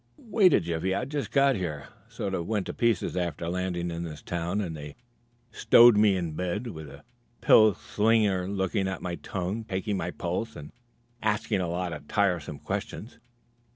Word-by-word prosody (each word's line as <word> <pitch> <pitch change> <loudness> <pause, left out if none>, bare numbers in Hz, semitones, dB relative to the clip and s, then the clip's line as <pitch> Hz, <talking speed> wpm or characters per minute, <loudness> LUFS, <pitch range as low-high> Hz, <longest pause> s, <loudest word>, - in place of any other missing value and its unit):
"Wait 210 -5 +3
a - - +5
jiffy. 85 +3 -2
I've 125 +6 -3
just 145 -1 -3
got 140 -1 +4
here. 80 -7 -4 0.2
Sort 100 - -4
of 85 -3 -2
went 105 -3 -1
to - - -5
pieces 115 -7 0
after 85 -2 -2
landing 90 -1 -2
in 85 0 -4
this 75 -3 -7
town, 85 +3 -2
and 85 -6 -3
they 75 -1 -9 0.6
stowed 120 +1 +6
me 105 -1 +4
in 85 -3 -3
bed, 90 +8 -3
with 80 -10 -7
a 70 - -13 0.4
pill 110 -3 +6
slinger 105 -3 +1
looking 95 0 -1
at 95 -1 -4
my 90 - -3
tongue, 95 +5 -4
taking 100 0 -3
my 90 - -3
pulse 90 +5 -4
and 75 0 -9 0.5
asking 105 -2 0
a 90 - -2
lot 90 0 -2
of 75 -2 -9
tiresome 90 -8 0
questions. 100 - -6
95 Hz, 180 wpm, -27 LUFS, 85-105 Hz, 0.6 s, stowed